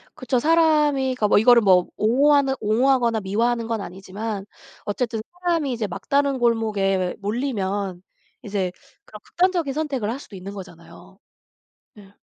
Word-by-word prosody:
그쵸. 255 0 -1
사람이니까 295 -6 +2
이거를 235 +2 +6
뭐 185 -3 +4
옹호하는 270 +5 +3
옹호하거나 235 +1 +2
미워하는 230 +4 0
건 225 -3 -2
아니지만 195 +3 -6 0.4
어쨌든 225 +1 -2 0.2
사람이 330 -6 0
이제 225 -3 -2
막다른 275 +8 -1
골목에 205 -6 0
몰리면 200 -5 -3 0.4
이제 195 -3 -2 0.3
그런 210 - -12
극단적인 350 -6 0
선택을 275 -8 -2
할 265 - -5
수도 205 - -13
있는 190 +2 -8
거잖아요. 175 -4 -13 0.8
네. 200 -2 -16
225 Hz, 330 characters per minute, -22 LUFS, 200-270 Hz, 0.8 s, 이거를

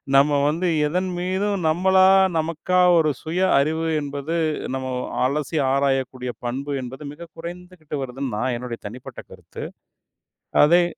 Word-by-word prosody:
நம்ம 140 +2 +6 0.2
வந்து 165 +5 0 0.2
எதன்மீதும் 185 +4 -1
நம்மளா, 185 +3 +4 0.3
நமக்கா 165 +3 0 0.2
ஒரு 155 -2 +3
சுய 165 +3 -2 0.2
அறிவு 160 +3 0
என்பது, 145 +3 -3 0.4
நம்ம 130 0 -4 0.4
அலசி 150 +3 -1
ஆராயக்கூடிய 135 -2 0
பண்பு 135 +4 -3
என்பது 130 +4 -8
மிகக் 165 +1 -12
குறைந்துகிட்டு 170 -2 -7
வருதுன்னு, 130 -2 -4
நான் 125 +2 0
என்னுடைய 120 -1 -6
தனிப்பட்ட 125 +4 -9
கருத்து. - - -9 1.0
அதே 175 +3 +5
150 Hz, 120 wpm, -23 LUFS, 135-175 Hz, 1.0 s, நம்ம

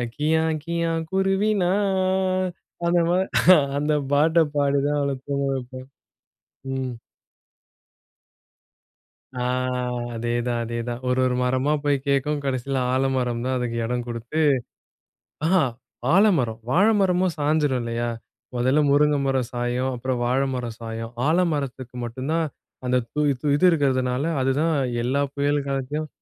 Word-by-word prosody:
"கியா! 160 +2 +2 0.2
கியா! 170 0 -1 0.2
குருவி 195 +2 +1
நான்" 190 -1 +1 0.4
அந்த 175 0 +3
மா 180 - +3 0.6
அந்த 150 +1 0 0.2
பாட்ட 160 +3 +4 0.2
பாடிதான், 145 +1 +1
அவள 140 -1 0
தூங்க 140 0 -1
வைப்பேன். 130 0 -7 0.9
ம். 130 -2 -3 2.5
ஆ, - - -2 0.7
அதேதான், 120 +1 -1
அதேதான். 120 +1 -4
ஒரு, 125 +1 +1
ஒரு 125 -1 +1
மரமா 130 +4 +1
போய் 145 -1 +2
கேட்கும் 140 +1 +1
கடைசில 135 0 -1 0.2
ஆலமரம் 130 -3 0
தான் 130 0 0
அதுக்கு 120 -1 -2
இடம் 125 0 -2
கொடுத்து 120 +6 -4 1.1
ஆஹா! 180 -1 +4 0.5
ஆலமரம், 160 - +3
வாழை 200 +9 +4
மரமும் 185 -2 +2
சாஞ்சிரும் 145 -3 +1
இல்லயா? 115 0 -2 0.5
முதல்ல 130 +5 +2
முருங்கை 145 0 +4
மரம் 130 -3 0
சாயும், 120 +2 -1
அப்புறம் 125 0 -2
வாழை 130 +3 +1
மரம் 120 -3 -4
சாயும். 115 0 -6 0.2
ஆலமரத்தக்கு 145 -7 -1
மட்டும் 130 +5 -5
தான், 165 -1 +1 0.4
அந்த 125 0 +2 0.2
து 150 - 0 0.2
து - - -3
இது 180 - +1
இருக்கிறதுனால 130 -3 +1 0.2
அதுதான் 150 +5 +1 0.3
எல்லா 135 +4 +1
புயல் 145 0 0
காலத்தையும் 140 +3 -2
135 Hz, 120 wpm, -24 LUFS, 125-160 Hz, 2.5 s, பாட்ட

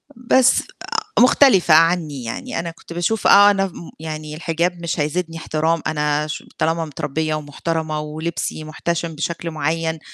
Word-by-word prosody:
بس 250 +1 +3
آآ، 435 -2 -3
مختلفة 250 - +5
عنّي 160 -4 +3
يعني 115 - -4
أنا 170 0 -4
كنت 165 +1 -12
باشوف 175 +6 0
آه، 205 +1 +8
أنا 195 -1 +1
ف - - -12
م 170 - -10
يعني 155 -1 -6
الحجاب 170 +2 -1
مش 170 0 -2
هيزيدني 165 +2 -2
احترام 160 0 0
أنا 150 0 0
ش 150 - -5
طالما 165 +1 0
متربية 155 +1 -2
ومحترمة 155 +1 -3
ولبسي 155 +1 -4
محتشم 165 +1 -3
بشكل 165 +2 -3
معيّن، 160 +1 -1
165 Hz, 155 wpm, -20 LUFS, 155-175 Hz, -, آه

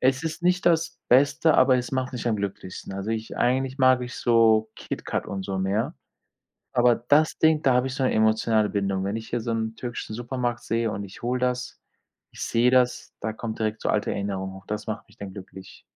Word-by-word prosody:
es 130 +2 +2
ist 160 +1 -4
nicht 180 0 +2
das 165 0 +2
Beste, 145 +5 +4
aber 130 -1 +5
es 125 +1 -3
macht 130 0 -1
mich 120 -1 -5
am 110 - +1
glücklichsten. 100 -1 -5
Also 100 +3 -4
ich 110 0 -4
eigentlich 130 +2 +1
mag 130 -1 +5
ich 125 - -6
so 110 -2 +4
KitKat - - -4
und 95 -1 -4
so 95 -1 -3
mehr, 105 - -1 0.8
aber 120 0 +4
das 145 +6 +2
Ding, 160 -1 +4
da 130 - +4
habe 125 +1 +2
ich 130 - -5
so 135 - -2
'ne - - +2
emotionale 110 0 +2
Bindung. 100 -2 -1
Wenn 100 +2 -2
ich 115 0 -7
hier 120 - -1
so 115 - -4
'n 110 0 -2
türkischen 120 -3 -5
Supermarkt 120 0 -3
sehe 115 -1 0
und 100 - -4
ich 95 - -12
hole 125 +1 -1
das 125 0 -2 0.5
ich - - -8
sehe 120 +2 +3
das, 125 -1 +2
da 110 +1 -2
kommt 110 0 -6
direkt 110 0 -2
so - - 0
alte 105 -1 0
Erinnerung 95 -1 -3
hoch. 95 0 -12
Das 105 0 -4
macht 110 0 -5
mich - - -22
dann 100 -1 -7
glücklich. 95 0 -11
115 Hz, 220 wpm, -25 LUFS, 105-130 Hz, 0.8 s, aber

